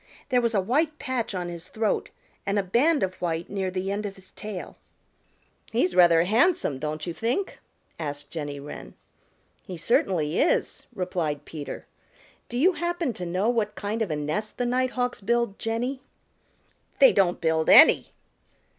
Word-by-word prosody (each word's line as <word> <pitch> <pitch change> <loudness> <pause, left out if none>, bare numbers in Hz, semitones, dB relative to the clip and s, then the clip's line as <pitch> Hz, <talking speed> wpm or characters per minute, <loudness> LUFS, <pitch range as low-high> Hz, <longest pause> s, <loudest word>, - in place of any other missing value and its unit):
There 250 -2 +3
was 230 -2 0
a 195 - +3
white 300 - 0
patch 255 -8 -3
on 180 -1 -3
his 170 0 -7
throat 220 -1 -1 0.3
and 200 +1 -1
a 200 - +2
band 270 - +2
of 185 -1 -1
white 170 -1 -2
near 195 -2 -1
the 185 +1 -3
end 205 +1 -2
of 195 - -8
his 190 -2 -16
tail. 210 -4 -7 0.9
"He's 185 -6 +1
rather 170 -2 +6
handsome, 220 - +2
don't 155 +1 -4
you 170 - -4
think?" 235 - -2 0.4
asked 145 -2 -5
Jenny 145 -3 -5
Wren. 140 - -9 0.7
"He 185 - -6
certainly 165 -4 +1
is," 320 - +1
replied 175 -6 -2
Peter. 150 -3 -7 0.6
"Do 240 - -4
you 340 +9 +5
happen 345 -6 -2
to 180 -3 -5
know 185 +5 0
what 225 -3 0
kind 215 +2 -3
of 215 - 0
a 155 - -1
nest 155 +9 -3
the 245 - 0
Nighthawks 250 -1 0
build, 235 0 0
Jenny?" 245 +4 -2 1.0
"They - - +7
don't 180 -3 +2
build 160 -1 +1
any." - - +8
195 Hz, 165 wpm, -26 LUFS, 170-240 Hz, 1.0 s, any